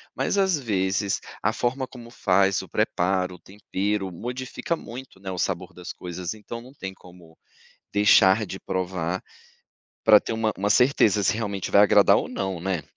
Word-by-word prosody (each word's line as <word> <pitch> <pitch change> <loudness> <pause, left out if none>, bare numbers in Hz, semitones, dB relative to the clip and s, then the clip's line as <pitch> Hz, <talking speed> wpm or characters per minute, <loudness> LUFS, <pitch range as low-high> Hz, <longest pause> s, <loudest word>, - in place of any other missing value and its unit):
Mas - - 0
às 190 -5 +2
vezes, 100 -4 0 0.2
a - - +1
forma 130 +2 -1
como 120 -2 -12
faz, 95 -3 +2
o - - -11
preparo, 90 0 0
o - - -16
tempero, 100 0 -3
modifica 125 - -4
muito, 130 -7 -10
né, 95 0 -6
o 90 - -5
sabor 90 0 -2
das 90 0 -8
coisas 90 0 -5
então 110 +2 -8
não 130 +3 -14
tem 95 -8 -7
como 90 -3 -17 0.6
deixar 105 0 +5
de 95 - -6
provar, 95 -1 -3 0.8
pra 110 -1 +8
ter - - -4
uma 110 -1 0
uma 100 +2 0
certeza 110 -4 +4
se - - +3
realmente 100 -4 -3
vai 100 - +7
agradar 105 - +6
ou - - -2
não, 95 -2 -3
né? 90 -2 -2
100 Hz, 170 wpm, -25 LUFS, 95-115 Hz, 0.8 s, pra